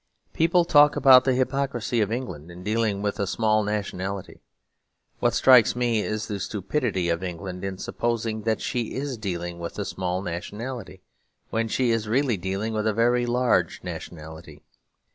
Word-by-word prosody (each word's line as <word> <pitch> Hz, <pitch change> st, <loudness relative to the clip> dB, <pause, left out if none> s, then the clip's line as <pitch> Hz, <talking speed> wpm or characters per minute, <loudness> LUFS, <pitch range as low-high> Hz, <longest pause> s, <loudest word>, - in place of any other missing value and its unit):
People 170 Hz, +2 st, +3 dB
talk 150 Hz, -2 st, +6 dB
about 130 Hz, -2 st, +7 dB
the 130 Hz, -2 st, +2 dB
hypocrisy 130 Hz, -3 st, 0 dB
of 105 Hz, 0 st, 0 dB
England 115 Hz, -, -5 dB
in 90 Hz, +1 st, -10 dB
dealing 105 Hz, -1 st, 0 dB
with 105 Hz, +1 st, -2 dB
a 100 Hz, -, 0 dB
small 110 Hz, +1 st, +2 dB
nationality. 100 Hz, -2 st, -4 dB, 0.8 s
What -, -, +1 dB
strikes 125 Hz, -4 st, +6 dB
me 120 Hz, -3 st, +1 dB
is 110 Hz, +1 st, -3 dB
the 105 Hz, -2 st, -4 dB
stupidity 100 Hz, -1 st, -2 dB
of 85 Hz, +1 st, 0 dB
England 90 Hz, 0 st, -6 dB
in 95 Hz, -1 st, -4 dB
supposing 115 Hz, +1 st, -2 dB
that 110 Hz, +1 st, -1 dB
she 120 Hz, -3 st, -2 dB
is 135 Hz, 0 st, -3 dB
dealing 85 Hz, -5 st, -4 dB
with 85 Hz, 0 st, -6 dB
a 100 Hz, -, -2 dB
small 95 Hz, 0 st, -3 dB
nationality; 100 Hz, +3 st, -6 dB, 0.5 s
when 115 Hz, 0 st, 0 dB
she 120 Hz, +2 st, +1 dB
is 115 Hz, -1 st, 0 dB
really 130 Hz, 0 st, +2 dB
dealing 95 Hz, +4 st, -3 dB
with 110 Hz, 0 st, -1 dB
a 110 Hz, -, +2 dB
very 120 Hz, +1 st, +2 dB
large 125 Hz, +1 st, +1 dB
nationality. 80 Hz, -1 st, -9 dB
110 Hz, 160 wpm, -25 LUFS, 95-120 Hz, 0.8 s, about